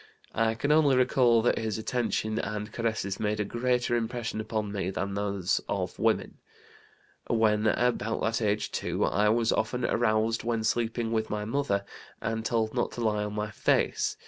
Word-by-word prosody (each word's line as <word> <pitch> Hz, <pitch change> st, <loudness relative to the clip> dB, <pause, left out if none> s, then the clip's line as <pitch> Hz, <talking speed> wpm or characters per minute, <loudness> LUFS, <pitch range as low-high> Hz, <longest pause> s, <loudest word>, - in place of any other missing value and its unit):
I 115 Hz, 0 st, +1 dB
can 145 Hz, +6 st, 0 dB
only 150 Hz, -3 st, +5 dB
recall 125 Hz, -2 st, +4 dB
that 120 Hz, -, +2 dB
his 110 Hz, -2 st, -2 dB
attention 110 Hz, -1 st, -1 dB
and 105 Hz, +1 st, -4 dB
caresses 110 Hz, -4 st, -2 dB
made 105 Hz, 0 st, -1 dB
a 105 Hz, -, 0 dB
greater 120 Hz, +2 st, 0 dB
impression 115 Hz, -1 st, -2 dB
upon 110 Hz, -1 st, -3 dB
me 95 Hz, -3 st, -2 dB
than 95 Hz, +1 st, -3 dB
those 100 Hz, -2 st, 0 dB
of -, -, -3 dB
women. -, -, 0 dB, 0.9 s
When 110 Hz, -1 st, +2 dB
about 115 Hz, 0 st, +1 dB
that 115 Hz, +1 st, 0 dB
age 105 Hz, -1 st, 0 dB
too -, -, -1 dB
I 105 Hz, +1 st, +2 dB
was 115 Hz, +1 st, +2 dB
often 125 Hz, +3 st, -1 dB
aroused 110 Hz, 0 st, +1 dB
when 115 Hz, -1 st, -1 dB
sleeping 115 Hz, 0 st, 0 dB
with 110 Hz, -1 st, 0 dB
my 105 Hz, 0 st, -2 dB
mother, 110 Hz, -5 st, 0 dB, 0.3 s
and 110 Hz, 0 st, -2 dB
told 110 Hz, -1 st, 0 dB
not 120 Hz, -, 0 dB
to 120 Hz, -, -5 dB
lie 105 Hz, -2 st, +1 dB
on 105 Hz, 0 st, -4 dB
my 105 Hz, 0 st, -2 dB
face. -, -, +1 dB
110 Hz, 170 wpm, -28 LUFS, 105-120 Hz, 0.9 s, only